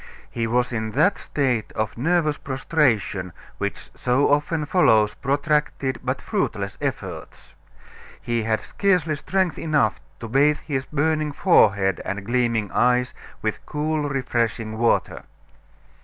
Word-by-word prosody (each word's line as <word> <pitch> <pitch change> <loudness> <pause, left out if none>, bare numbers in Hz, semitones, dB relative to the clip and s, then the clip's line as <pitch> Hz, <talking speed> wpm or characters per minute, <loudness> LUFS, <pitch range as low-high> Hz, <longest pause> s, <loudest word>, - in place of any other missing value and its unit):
He 115 -1 -2
was 125 +2 0
in 110 -2 -3
that 165 +9 +3
state 125 -7 -1
of 110 0 -2
nervous 155 +3 +1
prostration 125 - 0 0.3
which - - -4
so 125 +3 +1
often 150 +2 +1
follows 110 - +4
protracted 140 -1 -1
but - - -1
fruitless - - -2
efforts. - - -5 0.7
He 120 -1 -1
had 110 0 0
scarcely 180 -6 +1
strength 185 +3 -1
enough 145 -9 +1 0.2
to 115 - -6
bathe 145 +5 +3
his 135 -3 -3
burning 155 0 0
forehead 100 - +3
and 100 0 -4
gleaming 115 -3 0
eyes 125 0 +2 0.3
with - - -2
cool, 150 0 -1
refreshing 115 -4 -1
water. 120 0 +1
130 Hz, 125 wpm, -23 LUFS, 115-150 Hz, 0.7 s, follows